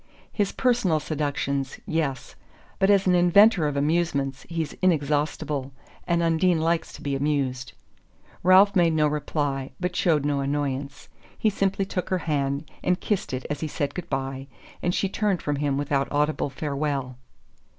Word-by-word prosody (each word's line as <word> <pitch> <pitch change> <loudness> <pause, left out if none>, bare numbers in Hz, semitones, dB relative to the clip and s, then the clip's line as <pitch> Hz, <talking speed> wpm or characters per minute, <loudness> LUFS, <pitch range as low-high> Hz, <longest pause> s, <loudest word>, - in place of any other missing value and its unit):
"His 205 -3 0
personal 235 -11 +2
seductions 140 -3 -2
yes. 155 -5 -2 0.5
But 195 0 +3
as 200 -1 +4
an 185 - +4
inventor 180 0 +5
of 145 -1 -2
amusements 140 -3 0
he's 165 -3 -3
inexhaustible; 150 -4 0 0.3
and 170 -1 +2
Undine 165 +1 +2
likes 165 +1 0
to - - -11
be 140 -1 -1
amused." 135 -3 -1 0.7
Ralph 190 +3 +6
made 170 -3 +4
no 155 -1 +3
reply 145 -2 -2
but 180 0 -2
showed 155 -6 +2
no 145 -1 +1
annoyance. 140 0 -3 0.3
He 215 - +2
simply 195 0 0
took 185 -1 -4
her 185 - +1
hand 140 -1 -1 0.2
and 180 0 +1
kissed 205 -3 -2
it 130 0 -4
as 145 - -3
he 160 - -2
said 145 -1 -3
good 175 -1 -6
bye; 135 0 -3 0.3
and 175 - +1
she 195 - +1
turned 195 -1 -1
from 145 -1 -1
him 140 -1 0
without 140 -1 -1
audible 150 0 0
farewell. 140 -2 -3
150 Hz, 160 wpm, -25 LUFS, 140-175 Hz, 0.7 s, Ralph